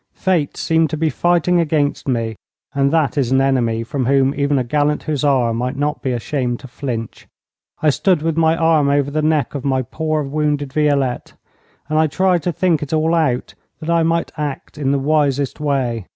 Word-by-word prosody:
Fate 175 Hz, -6 st, 0 dB
seemed 160 Hz, -1 st, +1 dB
to 155 Hz, -, -3 dB
be 160 Hz, 0 st, 0 dB
fighting 175 Hz, +3 st, +2 dB
against 150 Hz, -4 st, 0 dB
me, 115 Hz, -4 st, -1 dB, 0.4 s
and 140 Hz, 0 st, +2 dB
that 155 Hz, -3 st, +1 dB
is 130 Hz, -3 st, 0 dB
an 130 Hz, -, +4 dB
enemy 120 Hz, -4 st, +1 dB
from 130 Hz, +1 st, -3 dB
whom 135 Hz, 0 st, +3 dB
even 140 Hz, 0 st, +1 dB
a 130 Hz, -, +1 dB
gallant 145 Hz, +4 st, 0 dB
hussar 140 Hz, -6 st, +1 dB
might 125 Hz, +3 st, -2 dB
not 150 Hz, +2 st, -2 dB
be 130 Hz, -, -1 dB
ashamed 120 Hz, 0 st, -2 dB
to 135 Hz, -, -11 dB
flinch. 120 Hz, -3 st, -6 dB, 0.6 s
I 155 Hz, -, +5 dB
stood 175 Hz, +1 st, +1 dB
with 165 Hz, -1 st, 0 dB
my 165 Hz, 0 st, +3 dB
arm 160 Hz, -3 st, +3 dB
over 140 Hz, 0 st, +1 dB
the 155 Hz, +1 st, 0 dB
neck 155 Hz, -1 st, +1 dB
of 140 Hz, -3 st, -5 dB
my 130 Hz, -2 st, 0 dB
poor 155 Hz, +4 st, -2 dB
wounded 145 Hz, -1 st, -1 dB
Violette, 140 Hz, -4 st, 0 dB, 0.5 s
and 155 Hz, +1 st, +1 dB
I 160 Hz, -, +4 dB
tried 185 Hz, +2 st, +1 dB
to 175 Hz, -, -1 dB
think 170 Hz, -2 st, +1 dB
it 150 Hz, 0 st, -5 dB
all 160 Hz, +1 st, +2 dB
out, 150 Hz, -7 st, 0 dB, 0.3 s
that 160 Hz, +2 st, -3 dB
I 170 Hz, 0 st, +3 dB
might 165 Hz, +1 st, 0 dB
act 145 Hz, -3 st, -5 dB
in 135 Hz, -2 st, 0 dB
the 140 Hz, -, +2 dB
wisest 140 Hz, -1 st, 0 dB
way. 130 Hz, -8 st, -1 dB
145 Hz, 195 wpm, -19 LUFS, 135-155 Hz, 0.6 s, I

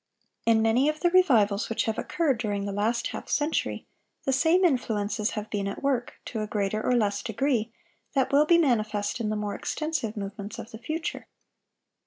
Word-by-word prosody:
In 225 Hz, -1 st, +5 dB
many 240 Hz, +6 st, +3 dB
of 305 Hz, 0 st, -3 dB
the 350 Hz, -, +3 dB
revivals 230 Hz, -, +4 dB
which 225 Hz, -, 0 dB
have 220 Hz, -1 st, -2 dB
occurred 290 Hz, -9 st, 0 dB
during 205 Hz, -3 st, -2 dB
the 200 Hz, -, -3 dB
last 220 Hz, +4 st, 0 dB
half -, -, -7 dB
century, 300 Hz, +2 st, 0 dB, 0.4 s
the 270 Hz, -, +1 dB
same 330 Hz, +7 st, +4 dB
influences 220 Hz, -, 0 dB
have 210 Hz, 0 st, -3 dB
been 200 Hz, -2 st, -1 dB
at 200 Hz, -, -5 dB
work, 260 Hz, -3 st, 0 dB
to 220 Hz, -, -4 dB
a 215 Hz, -, -3 dB
greater 210 Hz, -1 st, -1 dB
or 250 Hz, -, +2 dB
less 205 Hz, -3 st, +1 dB
degree, 235 Hz, -1 st, 0 dB, 0.4 s
that 265 Hz, 0 st, +2 dB
will 290 Hz, +2 st, +5 dB
be 340 Hz, -, +6 dB
manifest 220 Hz, -7 st, +1 dB
in 220 Hz, -2 st, -1 dB
the 215 Hz, -, -1 dB
more 210 Hz, -1 st, -2 dB
extensive 295 Hz, -9 st, -3 dB
movements 200 Hz, +1 st, -6 dB
of -, -, -8 dB
the 220 Hz, -, -9 dB
future. 315 Hz, +7 st, -4 dB
225 Hz, 190 wpm, -27 LUFS, 210-280 Hz, 0.4 s, be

